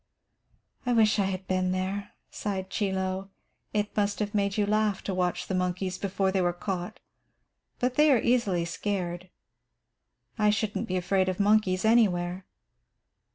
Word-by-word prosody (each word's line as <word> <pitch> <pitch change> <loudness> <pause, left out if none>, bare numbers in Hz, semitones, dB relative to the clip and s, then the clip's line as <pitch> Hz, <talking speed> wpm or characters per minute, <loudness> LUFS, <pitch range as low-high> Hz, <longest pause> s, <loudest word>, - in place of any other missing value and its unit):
"I 245 - +1
wish 220 -2 +4
I 200 - +3
had 190 0 -3
been 185 -1 +1
there," 190 +2 -3 0.2
sighed 190 -2 -4
Chie 200 -2 0
Lo. 190 0 -2 0.4
"It 210 -1 -1
must 205 -1 +1
have 210 -1 -2
made 200 -1 0
you 210 - +3
laugh 210 -1 +1
to 195 - -2
watch 180 -1 -1
the - - -4
monkeys 185 0 -1
before 195 -1 0
they 190 -1 +1
were 175 -1 +1
caught. 180 0 -4 0.8
But 250 0 0
they 300 0 +6
are 260 - +6
easily 210 -8 +1
scared. 180 -1 -3 1.1
I 210 0 +4
shouldn't 215 +1 -1
be 185 - -1
afraid 185 +1 +1
of 185 - -3
monkeys 200 -2 +3
anywhere." 185 -5 +2
195 Hz, 155 wpm, -28 LUFS, 185-210 Hz, 1.1 s, they